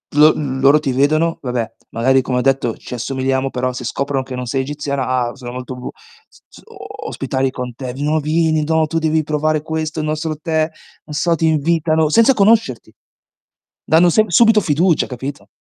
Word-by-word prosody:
Lo 150 +1 +7
loro 140 +1 +2
ti 145 -3 -2
vedono 155 +5 +1
vabbè, 125 -4 -3 0.2
magari 130 +3 +2
come 125 0 -1
ho - - +1
detto 135 -3 +1
ci - - -10
assomigliamo, 130 +2 -1
però 125 0 -2
se 125 -1 -7
scoprono 140 +1 -2
che 130 -1 -7
non 125 - -4
sei 135 +2 -1
egiziana, 140 -1 -3
ah, 125 -2 -1
sono 125 -3 -8
molto 125 0 -6
bu 125 0 -7 0.4
s - - -23
z - - -16
o - - -10
ospitali 135 0 -2
con 125 -1 -6
te: 125 -1 -6
"V 135 - -10
no, 150 +2 +1
vieni! 155 +1 +1
No, 160 0 +2
tu 165 - -2
devi 160 0 +1
provare 155 0 0
questo, 160 0 -4
il 155 - -2
nostro 155 +1 -2
tè", 155 0 -1 0.4
non 150 - -8
so, 170 +3 +1
ti 165 - -1
invitano 160 0 +1
senza 230 - +5
conoscerti! 205 - +2 0.9
Danno 165 +3 +4
sem 215 +6 +3
subito 220 +4 +5
fiducia, 165 +1 +1
capito? 135 +3 -7
145 Hz, 190 wpm, -18 LUFS, 130-160 Hz, 0.9 s, Lo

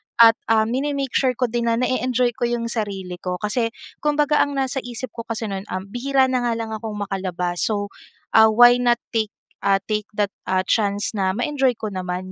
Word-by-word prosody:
at, 230 -1 +8
ah, 220 -1 +4
mine-make 270 +3 -2
sure 255 -2 +2
ko 250 -2 -1
din 235 0 -1
na 230 - +3
na-e-enjoy 250 0 +1
ko 240 - 0
yung 235 -1 -2
sarili 195 -5 -4
ko. 180 -1 -3
Kasi 220 +4 -1 0.3
kumbaga 295 0 +2
ang 285 -1 +1
nasa 270 0 -1
isip 245 -1 -6
ko 230 - -8
kasi 230 0 -3
no'n, 195 +1 -5
uhm, 190 +2 -5
bihira 260 +2 +2
na 255 - +2
nga 235 - +1
lang 225 -1 -4
akong 220 0 -5
makalabas, 180 -3 -3
so, 205 -2 -2 0.4
ah, 220 0 +7
why 240 +3 +6
not 240 -1 +3
take 220 -2 0 0.3
ah, 195 0 +3
take 210 -1 -2
that, 205 -1 0 0.2
ah, 185 0 +1
chance 200 -2 0
na 190 -2 0
ma-enjoy 265 0 +1
ko 215 -1 -5
naman 185 0 -4
225 Hz, 200 wpm, -22 LUFS, 200-250 Hz, 0.4 s, at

